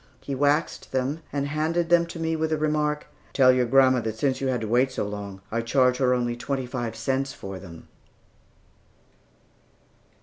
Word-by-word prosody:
He 140 - -6
waxed 145 +3 0
them, 135 +4 -1
and 140 -1 -1
handed 160 +3 -1
them 170 -1 +4
to 170 - -8
me 160 0 0
with 160 0 -1
the 155 - 0
remark, 150 -1 0 0.3
"Tell 130 -2 +6
your 125 -1 +2
grandma 130 0 +5
that 110 -1 -4
since 130 +2 0
you 135 - 0
had 125 -3 0
to 110 - -3
wait 125 +4 +2
so 115 - -2
long, 100 -2 -7
I 115 +1 0
charge 125 +1 +2
her 125 -1 +3
only 120 -1 -1
twenty 130 +2 -3
five 120 -2 -4
cents 135 0 -1
for 95 -1 -8
them." 85 -3 -12
130 Hz, 180 wpm, -25 LUFS, 120-150 Hz, 0.3 s, Tell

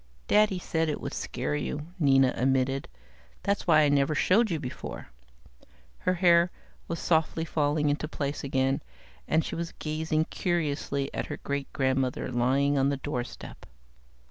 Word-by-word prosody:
"Daddy 210 -2 +4
said 165 -2 -1
it 150 - -2
would - - -5
scare 130 +4 -3
you," 150 +1 -4
Nina 135 -4 +4
admitted. 135 +1 +1 0.6
"That's 200 -1 -1
why 155 -3 +6
I 150 - +4
never 145 +2 +2
showed 215 +9 +3
you 165 -3 -1
before." 130 -4 -7 0.9
Her 185 - +1
hair 175 -1 +5 0.4
was 170 - -3
softly 160 0 +1
falling 150 -1 +1
into 145 +1 0
place 145 -2 -3
again, 135 0 +1 0.5
and 160 +1 +2
she - - -5
was 170 0 -4
gazing 155 0 -1
curiously 145 -5 -1
at - - -3
her - - -5
great 140 -1 -4
grandmother 130 -1 0
lying 135 +4 +2
on 135 +1 +3
the 140 - -1
doorstep. 130 -3 -6
145 Hz, 150 wpm, -28 LUFS, 135-165 Hz, 0.9 s, why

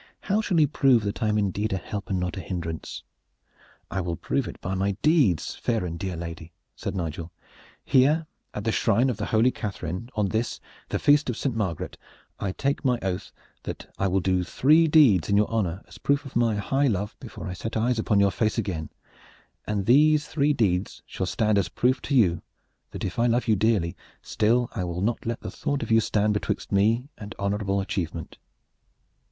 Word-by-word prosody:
How 210 +2 +1
shall 185 -6 +1
you 150 - +5
prove 135 -5 +3
that 100 0 -3
I 110 - +2
am 105 0 +1
indeed 105 +1 0
a - - 0
help 100 +2 -6
and 95 - 0
not 90 -2 -2
a - - -5
hindrance?" 85 -4 -5 0.9
"I 95 - -1
will 85 -1 -2
prove - - -1
it - - -8
by 95 - -4
my 100 +1 0
deeds, 145 - +3
fair 115 -6 -1
and 85 -1 -5
dear 95 -2 -3
lady," 85 0 -7 0.2
said - - -5
Nigel. 85 -1 -4 0.5
"Here 150 +5 +4 0.3
at - - -5
the - - +1
shrine 125 +3 +2
of 115 - -5
the - - -3
holy 115 +3 +3
Catharine, 100 0 -5
on 105 -2 +1
this, 110 +2 -2 0.3
the - - 0
Feast 145 -1 +4
of 120 - -2
Saint 130 -4 -2
Margaret, 95 -8 -3 0.4
I 95 - -2
take 140 +8 -1
my 125 -3 +2
oath 95 +1 -3 0.3
that - - -8
I 95 - +2
will 95 +1 +1
do 90 0 +1
three 155 - +4
deeds 135 - +5
in 100 - +3
your 105 - +3
honor 95 -5 -1
as - - -13
a - - -19
proof 140 +1 +1
of 135 - -10
my 115 -2 +2
high 135 +7 +1
love 105 -2 -1
before 120 - -9
I 90 - -4
set 115 +5 -4
eyes 120 +1 +1
upon 105 -2 +2
your 100 -1 +4
face 110 +3 0
again, 90 -8 -2 0.8
and 105 -2 -1
these 150 +4 +5
three 145 -1 +1
deeds 100 -9 0
shall 95 - -4
stand 105 +1 +2
as 95 - 0
a - - -16
proof 125 +2 +1
to 140 - -2
you 90 -9 +3 0.5
that - - -7
if 90 - -4
I 120 - +4
love 120 +1 +1
you 110 - +4
dearly, 100 -5 +1 0.3
still 120 +3 +2
I 95 - -2
will 90 0 -3
not 115 +3 -1
let 115 0 -2
the - - -6
thought 140 -3 -2
of 115 - -5
you 110 - +6
stand 105 -1 +1
betwixt 105 - -3
me 110 +6 +2
and 105 +1 -8
honorable 100 0 -1
achievement!" 85 -4 -4
105 Hz, 210 wpm, -26 LUFS, 95-125 Hz, 0.9 s, you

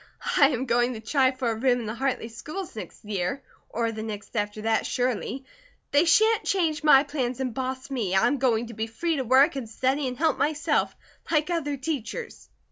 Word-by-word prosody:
I 280 - +7
am 260 -2 -2
going 240 0 +1
to - - -6
try 260 +4 +2
for 255 -3 -2
a - - 0
room 245 +1 +2
in - - -6
the 215 - -3
Hartley 255 -2 -2
schools 310 +10 -7
next 215 - -9
year, 205 +5 -2 0.3
or 230 0 -1
the 220 -1 -6
next 215 0 -7
after 210 0 -2
that, 225 0 +2
surely. 255 +2 -2 0.5
They 290 +4 +4
sha'n't 440 +7 +4
change 330 -5 0
my 285 -3 +7
plans 265 -4 -3
and 255 -3 -2
boss 260 +2 -4
me, 215 -8 -1
I 190 - +4
am 275 +3 +1
going 240 -3 +2
to - - -8
be 220 +1 -3
free 320 +8 -2
to 265 - -1
work, 265 +4 +4
and 250 -5 -5
study, 260 +5 0
and 250 -1 -4
help 315 -2 +1
myself, 300 +1 +1 0.3
like 310 +1 +1
other 295 -4 -1
teachers." 300 - -5
260 Hz, 210 wpm, -26 LUFS, 225-290 Hz, 0.5 s, I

